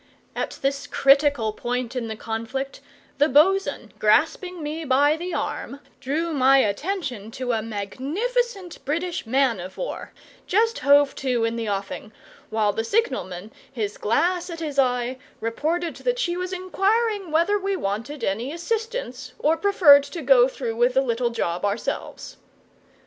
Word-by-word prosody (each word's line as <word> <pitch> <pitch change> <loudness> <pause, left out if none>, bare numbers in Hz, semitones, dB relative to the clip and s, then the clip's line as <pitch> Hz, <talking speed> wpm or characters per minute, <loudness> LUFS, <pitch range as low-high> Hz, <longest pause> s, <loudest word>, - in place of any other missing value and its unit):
At - - -3
this 275 0 -1
critical 275 -5 +3
point 245 +2 -3
in 240 -2 -2
the 220 - -4
conflict, 230 +5 -4 0.4
the 295 +2 +4
bo'sun, 380 +8 +3
grasping 360 -3 +2
me 310 +2 -4
by 285 +2 +3
the 350 +3 -5
arm, 280 - -4 0.2
drew 315 +5 -2
my 270 -1 +5
attention 260 - -1
to 255 -1 -2
a 225 -2 0
magnificent 350 - -3
British 330 0 -2
man 255 -3 +2
of 185 +2 -8
war, - - -5 0.4
just 455 +4 +2
hove 285 +1 +5
to 250 -3 0
in 230 0 0
the 225 -2 -3
offing, 200 +1 -4 0.4
while 215 -2 +1
the 225 - -1
signalman, 220 - -1 0.2
his 215 -6 -4
glass 350 - +1
at 335 -1 -6
his 295 -4 -3
eye, 250 -1 +1 0.2
reported 320 +9 -2
that - - -1
she 350 -8 0
was 365 +1 -3
inquiring 390 +2 0
whether 340 +7 +2
we 390 0 -1
wanted 230 - -4
any 225 +8 -1
assistance 345 - -4
or 310 +2 +2
preferred 330 -7 +6
to 300 +3 -7
go 255 -2 +6
through 240 -4 -4
with 245 +2 +3
the 265 - +5
little 240 -2 0
job 175 -7 -2
ourselves. 205 +2 -3
275 Hz, 150 wpm, -24 LUFS, 230-350 Hz, 0.4 s, preferred